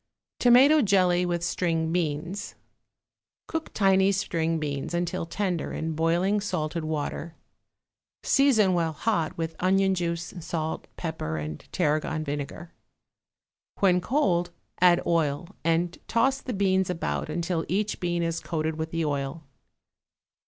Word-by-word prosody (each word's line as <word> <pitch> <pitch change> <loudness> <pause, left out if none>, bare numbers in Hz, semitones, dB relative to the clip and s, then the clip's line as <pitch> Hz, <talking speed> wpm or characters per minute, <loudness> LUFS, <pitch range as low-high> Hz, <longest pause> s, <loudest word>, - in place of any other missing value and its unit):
=Tomato 265 +5 +6
Jelly 180 -4 +3
with 175 -1 -1
String 165 -2 0
Beans.= 170 +3 -2 0.9
Cook 325 -1 -4
tiny 195 -1 +4
string 165 -4 0
beans 145 +1 -3
until 175 -1 -2
tender 180 -1 -2
in 160 0 -3
boiling 170 +6 +1
salted 170 -4 -2
water; 155 +1 -3 0.9
season 225 -9 +4
while 165 -2 0
hot 165 -3 -1
with 165 -1 -3
onion 190 +1 +3
juice, 170 -1 -2
salt, 160 -1 -4
pepper 160 - -3
and 75 0 -5
tarragon 155 -1 0
vinegar. 145 +3 -5 1.1
When 180 -2 +3
cold 180 - +1 0.3
add 180 -1 +5
oil 160 -1 0
and 165 +1 +1
toss 270 +4 +2
the 250 - -4
beans 190 -2 +2
about 75 - -2
until 170 -1 -1
each 205 +3 -1
bean 175 -1 -1
is 165 0 -1
coated 160 -1 -2
with 160 0 -3
the 165 -1 -1
oil. 145 +2 -3
170 Hz, 125 wpm, -26 LUFS, 160-190 Hz, 1.1 s, =Tomato